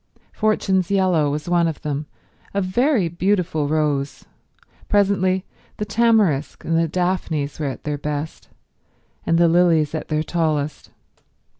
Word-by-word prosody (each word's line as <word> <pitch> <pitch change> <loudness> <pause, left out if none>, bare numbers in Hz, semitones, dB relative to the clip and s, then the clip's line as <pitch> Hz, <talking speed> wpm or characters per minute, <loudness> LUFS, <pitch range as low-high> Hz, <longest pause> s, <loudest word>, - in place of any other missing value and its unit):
Fortune's 195 -4 +1
Yellow 185 -6 +2
was 150 +2 -4
one 175 -1 +2
of 160 -1 -5
them; 150 0 -3 0.5
a - - +2
very 210 - +1
beautiful 175 -3 0
rose. 145 -2 -1 0.6
Presently 190 -2 +2 0.3
the 210 - -2
tamarisk 210 -9 +1
and 165 - 0
the 165 0 +2
daphnes 165 -4 -2
were 150 - -1
at 135 - -6
their 150 -1 -3
best, 150 +2 -5 0.8
and 165 - +3
the 170 0 +5
lilies 165 -3 +3
at 160 - -4
their 155 0 0
tallest. 155 -3 -2
165 Hz, 135 wpm, -21 LUFS, 150-190 Hz, 0.8 s, the